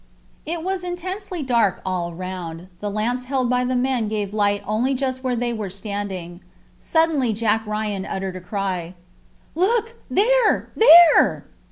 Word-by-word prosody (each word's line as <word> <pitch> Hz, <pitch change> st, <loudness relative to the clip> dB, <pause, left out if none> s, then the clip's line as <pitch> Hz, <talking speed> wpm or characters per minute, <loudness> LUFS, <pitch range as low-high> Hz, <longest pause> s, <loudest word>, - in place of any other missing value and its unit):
It 330 Hz, 0 st, -3 dB
was 375 Hz, 0 st, -2 dB
intensely 360 Hz, 0 st, -4 dB
dark 235 Hz, -7 st, +1 dB
all 180 Hz, -2 st, -2 dB
round. 180 Hz, -1 st, -7 dB
The 205 Hz, -, -3 dB
lamps 235 Hz, +5 st, -2 dB
held 255 Hz, -2 st, 0 dB
by 250 Hz, 0 st, +2 dB
the 255 Hz, +1 st, -1 dB
men 250 Hz, -3 st, 0 dB
gave 210 Hz, -2 st, -3 dB
light 205 Hz, -1 st, +1 dB
only 240 Hz, +6 st, 0 dB
just 260 Hz, 0 st, -2 dB
where 255 Hz, -1 st, 0 dB
they 240 Hz, 0 st, -1 dB
were 215 Hz, -4 st, -4 dB
standing. 190 Hz, -3 st, -6 dB, 0.4 s
Suddenly 315 Hz, -8 st, +1 dB
Jack 220 Hz, 0 st, +1 dB
Ryan 210 Hz, -2 st, -3 dB
uttered 190 Hz, -1 st, -4 dB
a 185 Hz, -, -7 dB
cry. 185 Hz, -2 st, -4 dB, 0.6 s
"Look 455 Hz, +7 st, 0 dB
there, 475 Hz, +2 st, +2 dB
there!" 345 Hz, -7 st, +7 dB
230 Hz, 150 wpm, -22 LUFS, 195-300 Hz, 0.6 s, there